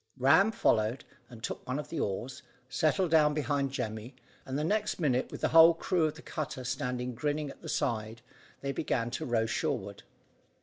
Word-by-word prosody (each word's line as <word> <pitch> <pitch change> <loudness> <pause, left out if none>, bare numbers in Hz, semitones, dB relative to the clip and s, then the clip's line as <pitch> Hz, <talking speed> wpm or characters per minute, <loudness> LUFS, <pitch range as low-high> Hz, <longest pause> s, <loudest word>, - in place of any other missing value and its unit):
Ram 160 - +5
followed, 110 - +1 0.2
and 115 -3 -12
took - - -5
one 130 +2 -1
of 150 - -5
the 165 - -4
oars, 120 +5 -3 0.3
settled 160 +6 +1
down 150 -2 +5
behind 145 -2 0
Jemmy, 115 -1 -5 0.3
and 135 +1 -2
the 150 - -1
next 210 +5 0
minute, 130 -6 +1
with - - -7
the - - +2
whole 165 +1 +8
crew 170 0 +1
of 155 - -2
the 160 - -12
cutter 145 -5 -5
standing 125 -1 -3
grinning 145 +3 -2
at - - -16
the - - -8
side, 110 0 -2 0.4
they 140 - -2
began 120 -4 -1
to 130 - -3
row 115 -2 +1
shoreward. 100 -3 -2
135 Hz, 185 wpm, -30 LUFS, 120-155 Hz, 0.4 s, whole